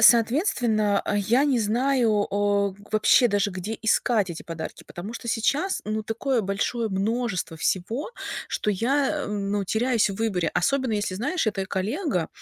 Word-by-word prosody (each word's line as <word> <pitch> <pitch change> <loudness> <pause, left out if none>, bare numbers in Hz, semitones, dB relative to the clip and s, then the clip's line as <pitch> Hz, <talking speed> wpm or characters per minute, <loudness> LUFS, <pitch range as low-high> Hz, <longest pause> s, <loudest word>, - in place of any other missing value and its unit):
соответственно, 230 - +4
а, 205 - -2
я 235 +7 +3
не 275 -4 +2
знаю, 225 -1 +2
о, 200 0 +1
г 190 - -16
вообще 220 +3 +5
даже 205 -1 +1
где 190 +4 -5
искать 220 -3 +2
эти 165 - -7
подарки. 165 -1 -7
Потому 185 +6 -7
что 235 0 -7
сейчас, 275 - 0
ну, 215 +1 -2
такое 235 +4 -1
большое 215 +3 -1
множество 205 -2 -1
всего, 220 - -1 0.4
что 210 - -1
я, 275 +8 +1
ам, 200 -1 -3
ну, 205 -1 0
теряюсь 230 +3 +2
в 195 - -4
выборе. 195 -6 0
Особенно 260 +6 +1
если, 205 -3 -1
знаешь, 290 - -1
это 195 -3 -1
коллега 200 - -1
215 Hz, 160 wpm, -25 LUFS, 200-245 Hz, 0.4 s, вообще